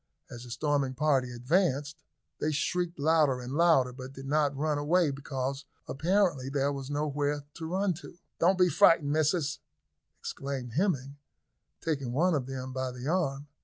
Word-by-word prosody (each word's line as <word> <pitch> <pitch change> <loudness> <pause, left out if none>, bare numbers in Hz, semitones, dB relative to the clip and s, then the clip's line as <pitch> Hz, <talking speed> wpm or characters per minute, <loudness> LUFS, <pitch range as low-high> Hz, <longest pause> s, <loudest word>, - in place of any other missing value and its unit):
As 120 0 -8
the - - -11
storming 140 +1 0
party 135 -4 +1
advanced, 145 +3 0 0.4
they 155 - 0
shrieked 175 +3 -1
louder 150 -3 +3
and 125 +1 -6
louder, 150 -6 +4
but 130 +1 -9
did 135 0 -9
not 145 0 +1
run 150 0 0
away, 160 +1 +2
because 135 0 -4 0.2
apparently 165 -4 +1
there 140 0 0
was 135 -1 -6
no 145 +1 -1
where 145 0 -1
to 160 -1 -6
run 190 +2 +1
to. - - -12 0.2
"Don't 180 +3 +4
be 180 -1 +5
frightened, 165 -6 +4
missis," 155 0 +1 0.6
exclaimed 135 -4 -5
Hemming, 145 - 0 0.6
taking 140 -7 -2
one 175 +7 +3
of 135 -4 -1
them 130 -1 -5
by 130 0 -2
the 125 +1 -7
arm. 150 -5 0
145 Hz, 165 wpm, -29 LUFS, 135-160 Hz, 0.6 s, be